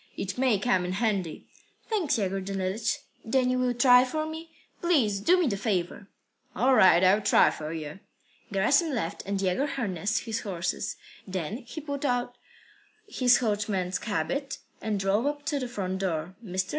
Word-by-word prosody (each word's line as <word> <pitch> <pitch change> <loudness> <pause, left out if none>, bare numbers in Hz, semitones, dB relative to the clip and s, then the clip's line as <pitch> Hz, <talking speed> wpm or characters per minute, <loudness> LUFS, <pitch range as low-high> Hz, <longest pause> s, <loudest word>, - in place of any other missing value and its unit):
It 190 -1 -3
may 250 -4 +2
come 195 -3 +1
in 180 +1 -3
handy." 195 -6 -1 0.4
"Thanks, 345 - 0
Yegor 195 -2 -1
Danilych. 195 +3 -2 0.2
Then 255 +2 +1
you 255 - 0
will 250 -1 +1
try 250 0 +6
for 310 +5 -2
me? 320 +1 -7 0.3
Please 260 - +2
do 355 - +4
me 355 - +2
the 210 -8 0
favour." 195 -2 -2 0.5
"All 255 +6 +3
right. 185 -6 +6
I'll 195 +3 +5
try - - +5
for 155 0 -6
you." 155 +1 -6 0.5
Gerasim 275 - +2
left, 170 -8 -3
and 200 0 -1
Yegor 195 +9 0
harnessed 205 - -2
up - - -15
his 225 -1 -2
horses. 185 +1 -3 0.3
Then 190 +2 -3
he 265 +5 -9
put 285 -1 -5
on 245 -3 0 0.8
his 250 -11 +4
coachman's 205 -5 -1
habit, 275 +5 -2 0.2
and 215 -2 -1
drove 200 +6 +1
up 290 0 -3
to 300 -2 -1
the 255 - -3
front 190 -5 -3
door. 175 -2 -2
Mr. 185 -2 -2
215 Hz, 170 wpm, -27 LUFS, 190-260 Hz, 0.8 s, try